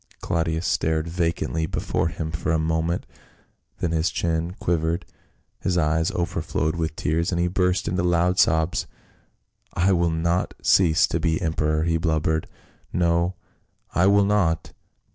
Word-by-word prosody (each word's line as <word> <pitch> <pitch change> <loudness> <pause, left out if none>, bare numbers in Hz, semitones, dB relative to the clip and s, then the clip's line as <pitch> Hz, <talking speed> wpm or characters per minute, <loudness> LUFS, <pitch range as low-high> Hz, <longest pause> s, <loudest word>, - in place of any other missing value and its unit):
Claudius 80 0 -1
stared 80 -1 0
vacantly 85 -1 -1
before - - -1
him 80 0 -4
for 80 0 -2
a 80 - +3
moment, 80 +2 -1 0.7
then 85 - -1
his 80 +1 +1
chin 85 +1 -2
quivered, 85 0 0 0.5
his 90 -1 0
eyes 80 +1 +2
overflowed 85 -2 -1
with 80 -1 -2
tears 85 +3 0
and 85 - 0
he 85 - +2
burst 90 0 0
into 90 0 0
loud 90 +1 +2
sobs. 80 +2 +2 0.4
" - - -42
I 95 - +4
will 85 -2 +2
not 85 +2 0
cease 85 -5 +4
to - - -2
be 80 -2 0
emperor," 80 -2 0
he 85 0 +1
blubbered. 80 -1 0 0.3
" - - -36
No, 85 +1 +1 0.6
I 90 +2 +3
will 100 0 +5
not 90 -6 +1
85 Hz, 150 wpm, -24 LUFS, 80-90 Hz, 0.7 s, will